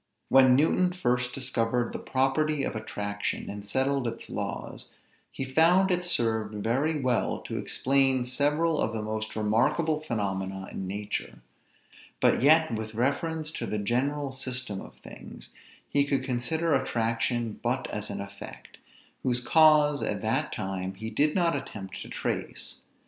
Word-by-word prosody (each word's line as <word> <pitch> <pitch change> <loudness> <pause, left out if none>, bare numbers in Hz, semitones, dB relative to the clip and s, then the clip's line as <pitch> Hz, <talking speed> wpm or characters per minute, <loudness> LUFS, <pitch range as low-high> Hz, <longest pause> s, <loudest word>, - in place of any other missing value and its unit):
When 130 -1 +7
Newton 180 +5 +3
first 125 -7 0
discovered 120 -2 -1
the - - -4
property 135 +3 +1
of - - -2
attraction, 105 -1 -3
and 100 0 -7
settled 130 +4 0
its 115 - -6
laws, - - -5 0.4
he 135 - -4
found 170 +8 +4
it 180 0 +1
served 110 -10 +1
very 145 +7 +1
well 130 -3 +1
to - - -4
explain 135 -1 +2
several 150 +6 +1
of 110 - 0
the 110 - -2
most 110 0 -4
remarkable 135 +9 +2
phenomena 95 -8 -3
in 95 - -5
nature; 100 - -4 0.8
but - - +3
yet, 155 0 +5
with 110 0 -4
reference 155 +6 -1
to - - -4
the 105 - -2
general 135 +7 0
system 125 -6 -4
of - - -12
things, - - -10 0.3
he 140 - +3
could 140 -2 0
consider 145 +6 0
attraction 115 -2 0
but 125 +3 -1
as 105 0 -4
an 100 0 -4
effect, 100 0 -10 0.4
whose 125 -1 +1
cause 150 0 +5
at - - -2
that - - 0
time 95 0 -3
he 110 +3 -6
did 150 +7 +2
not 170 -4 +2
attempt 105 -9 -6
to - - -8
trace. - - -4
125 Hz, 150 wpm, -28 LUFS, 110-150 Hz, 0.8 s, When